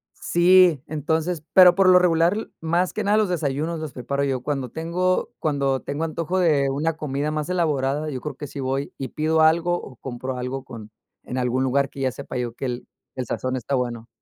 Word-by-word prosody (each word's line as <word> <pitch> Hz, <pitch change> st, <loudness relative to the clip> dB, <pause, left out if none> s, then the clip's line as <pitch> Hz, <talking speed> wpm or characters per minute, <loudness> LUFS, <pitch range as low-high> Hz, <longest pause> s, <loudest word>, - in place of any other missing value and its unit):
Sí, 175 Hz, -4 st, +4 dB
entonces, 160 Hz, +2 st, -1 dB
pero 180 Hz, -2 st, +8 dB
por 195 Hz, -1 st, +4 dB
lo 180 Hz, -, +8 dB
regular, 180 Hz, +4 st, +2 dB
más 170 Hz, +3 st, 0 dB
que 215 Hz, -, -2 dB
nada 205 Hz, +1 st, +3 dB
los 215 Hz, -3 st, +2 dB
desayunos, 160 Hz, 0 st, -1 dB
los 155 Hz, -3 st, -6 dB
preparo 140 Hz, +3 st, -2 dB
yo. 135 Hz, -3 st, -1 dB
Cuando 135 Hz, -2 st, -3 dB
tengo 175 Hz, +5 st, -1 dB
cuando 140 Hz, -3 st, 0 dB
tengo 145 Hz, +3 st, -4 dB
antojo, 165 Hz, +3 st, -2 dB
de 150 Hz, -6 st, +3 dB
una 150 Hz, +4 st, 0 dB
comida 145 Hz, 0 st, -2 dB
más 155 Hz, +1 st, -3 dB
elaborada, 150 Hz, -4 st, 0 dB
yo 130 Hz, -, -4 dB
creo 150 Hz, -3 st, -5 dB
que 145 Hz, +2 st, -7 dB
sí 140 Hz, -, -8 dB
voy, 135 Hz, +1 st, -2 dB
y 135 Hz, -, -5 dB
pido 160 Hz, +1 st, +1 dB
algo, 165 Hz, +2 st, +4 dB
o, 130 Hz, -, -11 dB
compro 130 Hz, +1 st, -5 dB
algo, 125 Hz, +2 st, -4 dB
con 110 Hz, -4 st, -10 dB, 0.3 s
en 125 Hz, -, -5 dB
algún 125 Hz, +1 st, 0 dB
lugar, 135 Hz, +1 st, +1 dB
que 135 Hz, -, -9 dB
ya 130 Hz, -1 st, +1 dB
sepa 140 Hz, -1 st, -7 dB
yo, 120 Hz, -2 st, -3 dB
que 135 Hz, -, -6 dB
el 125 Hz, -1 st, -4 dB, 0.3 s
el 130 Hz, -2 st, -3 dB
sazón 130 Hz, +3 st, -2 dB
está 130 Hz, +3 st, -2 dB
bueno. 120 Hz, -2 st, -3 dB
145 Hz, 205 wpm, -23 LUFS, 130-165 Hz, 0.3 s, pero